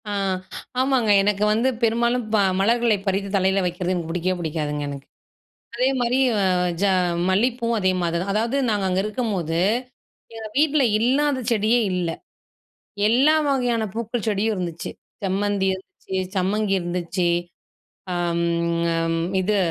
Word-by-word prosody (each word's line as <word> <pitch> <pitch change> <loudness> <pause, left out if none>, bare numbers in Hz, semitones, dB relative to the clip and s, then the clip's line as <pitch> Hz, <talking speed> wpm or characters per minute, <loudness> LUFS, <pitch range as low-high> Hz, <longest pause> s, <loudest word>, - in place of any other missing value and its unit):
ஆ, - - -3 0.7
ஆமாங்க. 260 -4 +1
எனக்கு 205 0 +1
வந்து 235 +4 +2
பெரும்பாலும் 235 +2 +2
ப - - +5 0.2
மலர்களை 230 +1 +3
பறித்து 195 +1 0
தலையில 190 0 +2
வைக்கிறது 180 +1 -1
எனக்கு 170 -3 -3
புடிக்கவே 180 +2 -1
புடிக்காதுங்க 150 -3 -3
எனக்கு. 140 -1 -8 0.7
அதே 250 +2 +2
மாரி 245 +1 +1 0.2
ஆ - - +2 0.4
ஜ - - +1 0.5
மல்லி 205 +7 +3
பூவும் 230 -1 0
அதே 185 -2 +2
மாரி 170 -1 -1
தான். 195 +2 -2
அதாவது 230 +5 0
நாங்க 205 -3 0
அங்க 185 0 +1
இருக்கும்போது, 205 -7 -2 0.8
எங்க 220 -1 -6
வீட்ல 300 -1 +3 0.2
இல்லாத 265 +3 +2
செடியே 225 +2 +3
இல்ல. 180 -2 -1 1.0
எல்லா 265 +8 +4
வகையான 245 -5 +1
பூக்கள் 230 0 -3
செடியும் 215 +1 +1
இருந்துச்சு. 170 -3 -4 0.3
செம்மந்தி 195 0 0
இருந்துச்சு, 190 0 -7 0.2
சம்மங்கி 195 +2 0
இருந்துச்சு. 175 0 -2 0.9
ஆம் 170 -1 0 0.5
ஆம். 165 0 0 0.2
இது 205 +3 +1
205 Hz, 135 wpm, -23 LUFS, 180-235 Hz, 1.0 s, ப